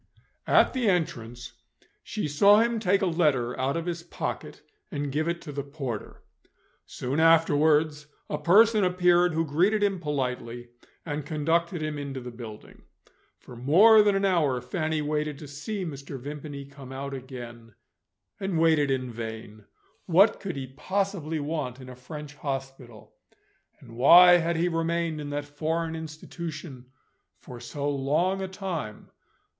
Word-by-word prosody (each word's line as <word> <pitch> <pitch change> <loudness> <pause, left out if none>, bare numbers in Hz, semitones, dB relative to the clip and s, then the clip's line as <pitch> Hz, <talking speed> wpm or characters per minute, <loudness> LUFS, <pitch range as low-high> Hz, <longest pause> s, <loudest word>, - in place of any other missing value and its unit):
At - - +4
the 250 -5 +1
entrance 120 - -2 0.5
she 210 -7 -4
saw 200 +9 +5
him 230 0 +1
take 200 -1 +2
a - - +3
letter 150 -9 +1
out 135 +4 0
of 165 - -4
his 170 -1 -3
pocket, 170 - -6 0.3
and 145 -1 -3
give 155 +3 -1
it 170 0 -3
to 150 - -7
the 140 0 -3
porter. 135 -6 -6 0.6
Soon 135 +5 -3
afterwards, 155 -2 +3 0.2
a - - -3
person 215 +4 +5
appeared 180 -1 +3
who 165 0 +1
greeted 185 +9 +2
him 195 -2 +1
politely, 125 -6 -4 0.4
and 150 -2 -3
conducted 160 +3 -1
him 155 -1 -3
into 140 -2 -5
the 125 -1 -8
building. 115 -3 -11 0.6
For 125 - -13
more 190 - +6
than 205 -1 +3
an 195 0 +1
hour, 155 -9 +2
Fanny 155 +4 -2
waited 150 -1 -2
to 150 - -10
see 185 +8 -5
Mr. 140 -3 -7
Vimpany 145 +1 -7
come 140 -1 -12
out 140 +1 -5
again, 120 -4 -9 0.6
and 195 -3 -2
waited 160 -3 +3
in 130 -2 -1
vain. 110 -2 -8 0.4
What 195 +5 +5
could 190 -5 -5
he 135 -1 -4
possibly 165 +3 -2
want 145 -4 -3
in 130 -1 -11
a 125 - -9
French 150 +3 -9
hospital? 135 -5 -7 0.7
And 115 - -14
why 175 +8 +8
had 170 0 -1
he 170 +2 +1
remained 165 -1 -1
in 145 - -6
that 145 0 -3
foreign 160 +3 -2
institution 155 -3 -8 0.5
for 125 - -11
so 140 +4 -5
long 150 +7 0
a 190 - -3
time? 185 - -6
150 Hz, 150 wpm, -27 LUFS, 135-170 Hz, 0.7 s, why